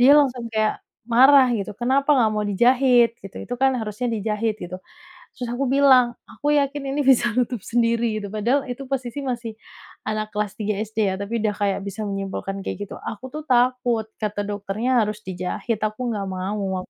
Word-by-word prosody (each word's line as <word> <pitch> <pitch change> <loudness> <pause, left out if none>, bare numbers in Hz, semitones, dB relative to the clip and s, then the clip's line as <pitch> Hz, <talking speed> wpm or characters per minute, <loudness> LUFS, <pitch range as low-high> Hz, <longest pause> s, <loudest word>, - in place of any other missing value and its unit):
dia 275 +4 +8
langsung 250 -5 +2
kayak 215 -1 0 0.2
marah, 260 +3 +6
gitu, 205 -3 -2
"Kenapa 275 +5 +2
enggak 230 -5 +3
mau 210 0 -1
dijahit?" 240 +2 +4
Gitu, 195 - -9
"itu 245 - -2
kan, 270 0 +4
harusnya 220 +1 -3
dijahit!" 220 0 -1
gitu. 180 +1 -6 0.6
Terus 245 -2 -5
aku 265 +1 -1
bilang, 260 -3 +5
"Aku 290 +6 -4
yakin 285 0 +1
ini 285 -1 -1
bisa 250 -2 +5
nutup 245 -4 0
sendiri," 230 -1 +1
gitu. 205 - -5
Padahal, 240 +6 +1
itu 255 +1 -7
posisi 265 0 -3
masih 240 -4 -4 0.5
anak 215 0 -3
kelas 210 -1 -2
3 210 -1 -2
SD 215 -2 -1
ya, - - -2
tapi 220 +4 -2
udah 210 -1 +1
kayak 200 -1 -1
bisa 200 +2 -5
menyimpulkan 195 0 -4
kayak 205 +1 -4
gitu. - - -7
"Aku 250 +4 -7
tuh 305 +3 -7
takut. 245 -3 +2
Kata 210 -1 -2
dokternya 215 +4 0
harus 210 0 -5
dijahit, 185 +4 -3
aku 215 +3 -2
enggak 205 -3 -2
mau," 190 0 -2
aku - - -14
230 Hz, 185 wpm, -23 LUFS, 210-255 Hz, 0.6 s, dia